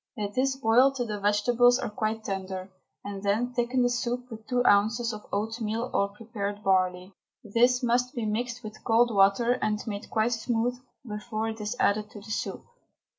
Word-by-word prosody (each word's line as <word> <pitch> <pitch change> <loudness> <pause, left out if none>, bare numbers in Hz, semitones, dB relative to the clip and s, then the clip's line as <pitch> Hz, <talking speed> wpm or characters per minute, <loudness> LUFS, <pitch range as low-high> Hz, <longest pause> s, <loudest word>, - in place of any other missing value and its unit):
Let 205 -1 -3
this 265 +2 +1
boil 255 +1 +4
till 260 -3 -3
the 210 -2 -4
vegetables 240 +4 +4
are - - -3
quite 215 +1 -2
tender, 190 -1 -4 0.3
and 200 -1 -5
then 220 +5 0
thicken 245 +1 +1
the 245 - +3
soup 245 0 -2
with 220 -1 -10
two 245 -1 +1
ounces 225 +3 +3
of 210 0 -9
oatmeal 225 +3 -2
or 200 - +2
prepared 205 -1 -5
barley. 185 -1 +1 0.3
This 245 +4 +2
must 245 +3 +1
be 235 -3 -2
mixed 240 +3 -2
with 215 0 -9
cold 235 +1 +3
water 210 +5 +4
and 210 0 0
made 205 -2 -5
quite 225 +2 +1
smooth 235 +1 0 0.3
before 215 +1 -3
it 220 0 -6
is 210 +3 -3
added 210 +1 +2
to 210 - -10
the 205 +2 -10
soup. - - -3
225 Hz, 180 wpm, -27 LUFS, 205-245 Hz, 0.3 s, boil